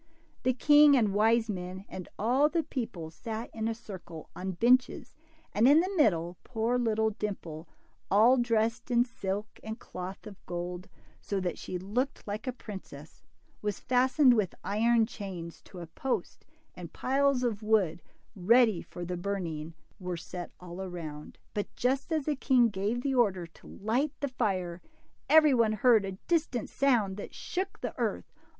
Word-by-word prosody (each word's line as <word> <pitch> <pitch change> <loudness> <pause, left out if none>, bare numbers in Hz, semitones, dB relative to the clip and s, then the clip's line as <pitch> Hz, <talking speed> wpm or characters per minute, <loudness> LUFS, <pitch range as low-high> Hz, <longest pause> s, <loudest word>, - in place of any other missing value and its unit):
The 255 0 +2
king 295 +1 +7
and 215 -5 +2
wise 225 +2 +3
men 185 -1 -5
and 185 -2 -8
all 255 +7 +3
the 330 0 0
people 225 - -5
sat 225 +5 -6
in 220 0 -2
a 225 - -1
circle 185 -7 -10
on 190 +1 -4
benches, 245 +7 +2 0.4
and 220 +4 +4
in 290 +3 +7
the 370 +4 0
middle 175 - +2
poor 240 +1 0
little 220 -2 +1
Dimple, 180 -6 -5 0.4
all 225 +6 +6
dressed 230 -1 0
in 240 0 +4
silk 205 -3 -5
and 220 +1 -5
cloth 185 +3 -8
of 205 -3 -11
gold, 180 +2 -5 0.3
so 200 - -2
that 180 -2 -3
she 180 - -4
looked 235 +11 -2
like 210 +4 -4
a - - +1
princess, 190 - -10 0.4
was 210 -2 -2
fastened 255 +1 +4
with 210 -6 0
iron 225 +3 +3
chains 185 -7 -7
to 185 - -13
a - - -6
post, 250 +10 -4 0.3
and - - -9
piles 275 -1 +1
of 225 -4 -1
wood, 200 -7 +2 0.3
ready 220 0 +4
for 175 - -8
the 180 +1 -3
burning, 170 -4 -4 0.2
were 180 -2 -4
set 175 +1 -7
all 180 -1 -9
round. 170 -6 -7 0.2
But 205 - -4
just 265 +5 0
as 310 -3 0
the 300 - 0
king 255 -3 +4
gave 210 +4 -2
the 275 - 0
order 200 -8 +2
to 165 - -17
light 245 +8 -1
the 285 - -2
fire, 185 -8 -2 0.5
every 310 -2 +7
one 230 -3 +3
heard 220 -1 +4
a 195 - -4
distant 310 -9 0
sound 230 -8 +2
that 205 - -8
shook 380 +2 -4
the - - -3
earth. - - -2
215 Hz, 165 wpm, -30 LUFS, 185-250 Hz, 0.5 s, king